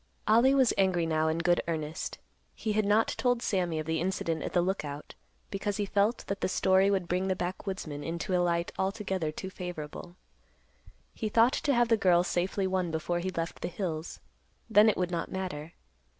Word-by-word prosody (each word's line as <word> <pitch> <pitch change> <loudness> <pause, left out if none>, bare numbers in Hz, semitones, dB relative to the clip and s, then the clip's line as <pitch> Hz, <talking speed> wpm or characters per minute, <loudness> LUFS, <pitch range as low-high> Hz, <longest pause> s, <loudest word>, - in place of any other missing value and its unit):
Ollie 235 +5 +5
was 260 -3 +4
angry 185 -3 +3
now 160 -1 +1
in 160 +1 +1
good 175 +1 +2
earnest. 155 -2 -3 0.4
He 215 - -2
had 215 0 +1
not 210 +2 +3
told 245 -1 0
Sammy 175 -5 0
of 155 - -3
the 160 0 -1
incident 170 -3 -1
at - - -4
the 180 - +3
Lookout 150 -6 -4 0.4
because 200 0 -2
he 205 - 0
felt 205 +4 +1
that 195 0 -4
the - - +1
story 190 +1 +3
would 190 -3 0
bring 180 +2 0
the 190 - +1
backwoodsman 180 -5 -4
into 170 +3 -2
a 180 - +3
light 170 -1 0
altogether 190 -4 -1
too 190 +5 -7
favorable. 175 -2 -7 1.0
He 215 - -3
thought 230 +4 +4
to 285 - +1
have 240 -1 +3
the 225 - +4
girl 180 -4 +4
safely 185 +2 -1
won 185 -2 0
before 165 +2 -1
he 185 +2 -2
left 170 -2 -4
the - - -2
hills; 170 -3 -4 0.5
then 220 -1 +6
it - - 0
would 180 -1 -1
not 170 -1 -3
matter. 170 -4 -5
185 Hz, 195 wpm, -29 LUFS, 170-200 Hz, 1.0 s, then